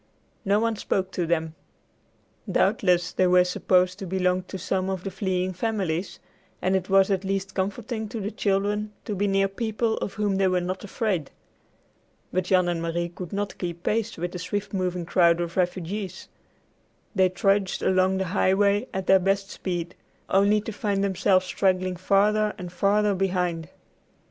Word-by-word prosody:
No 200 0 +2
one 225 -1 0
spoke 190 -2 -1
to 175 -3 -2
them. 160 -1 0 1.0
Doubtless 180 -3 +2
they 185 - +2
were 180 0 +6
supposed 180 +1 +1
to 195 - -5
belong 185 0 +1
to - - -6
some 190 0 -1
one 190 - 0
of 185 - -11
the 195 - -4
fleeing 185 -1 -1
families, 185 -3 -2 0.4
and 185 +1 +1
it 190 0 -1
was 195 +1 +4
at 195 0 0
least 195 0 -2
comforting 220 +3 -3
to 225 - -5
the 205 +1 -3
children 205 +1 -1
to 210 - -3
be 200 +1 0
near 195 0 +2
people 220 +2 -1
of - - -4
whom 205 -3 0
they 195 -1 +3
were 185 -1 +2
not 185 +1 -4
afraid. 200 - -2 1.0
But 185 0 0
Jan 180 -1 +3
and 170 -1 -1
Marie 170 +1 -2
could 175 0 -8
not 200 0 -3
keep 175 -1 -5
pace 225 +1 -1
with 175 +1 -3
the 180 - -6
swift 200 +3 -4
moving 180 -2 -1
crowd 170 -1 +4
of 170 0 -3
refugees. 185 +1 -2 0.8
They 190 -3 +4
trudged 195 +1 +1
along 190 0 +3
the 190 - -1
highway 200 +3 +2
at 190 0 -3
their 190 0 +6
best 195 +1 0
speed, 175 -1 -4 0.4
only 200 +2 +4
to 220 - -6
find 200 -1 -1
themselves 190 -1 +2
straggling 185 -1 0
farther 210 +3 +2
and 180 -3 -7
farther 205 +3 +2
behind. 180 -4 -1
190 Hz, 175 wpm, -25 LUFS, 180-200 Hz, 1.0 s, were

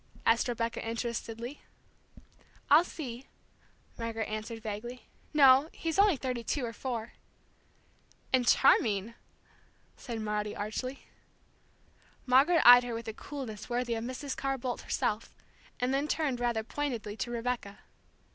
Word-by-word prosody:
asked 230 +2 +3
Rebecca, 230 -1 -2
interestedly. 230 +2 -4 1.1
"I'll 305 +4 +8
see," 265 -7 -7 0.7
Margaret 225 -1 -3
answered 215 +2 -5
vaguely. 225 +3 -6 0.3
"No, 275 0 +6
he's 325 +2 -2
only 400 -6 +5
thirty 250 -2 -3
two 255 +3 -1
or 230 - -5
four." 235 -2 -4 1.2
"And 250 -2 +3
charming!" 220 -5 +4 0.8
said 235 -2 -6
Maudie 210 -1 -2
archly. 255 +6 -4 1.2
Margaret 275 +7 +5
eyed 245 0 +10
her 240 -1 -4
with 230 0 -6
a - - -5
coolness 255 -6 -7
worthy 240 0 -1
of 225 0 -3
Mrs. 260 +3 -4
Carr 270 0 -1
Boldt 250 -1 -4
herself, 215 +1 -2 0.4
and 250 +1 0
then 280 +2 0
turned 290 -5 0
rather 240 -2 0
pointedly 235 -5 -3
to 240 - -3
Rebecca. 235 -3 -3
240 Hz, 130 wpm, -30 LUFS, 225-265 Hz, 1.2 s, eyed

